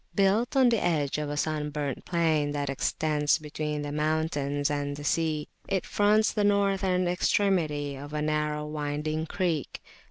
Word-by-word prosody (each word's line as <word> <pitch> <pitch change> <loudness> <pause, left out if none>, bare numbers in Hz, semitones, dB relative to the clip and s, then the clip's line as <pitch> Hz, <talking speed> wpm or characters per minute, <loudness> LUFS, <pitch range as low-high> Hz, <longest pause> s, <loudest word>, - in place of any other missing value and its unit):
Built 205 +6 +2
on 260 -2 +6
the 230 -3 +1
edge 150 -4 0
of 150 -1 -3
a 145 - -3
sunburnt 150 -3 -2
plain 160 -4 +1
that 145 -1 -2
extends 150 +2 +1
between 150 -1 -4
the 145 - -4
mountains 150 -2 0
and 145 -1 -2
the 145 - -7
sea, 155 0 0 0.2
it 190 -3 -1
fronts 210 +1 +3
the 210 - +1
northern 195 -3 +2
extremity 170 -6 +1
of 145 +2 -9
a 150 0 -2
narrow 150 0 -1
winding 150 +1 -3
creek. 170 -6 -2
155 Hz, 155 wpm, -28 LUFS, 145-180 Hz, 0.2 s, on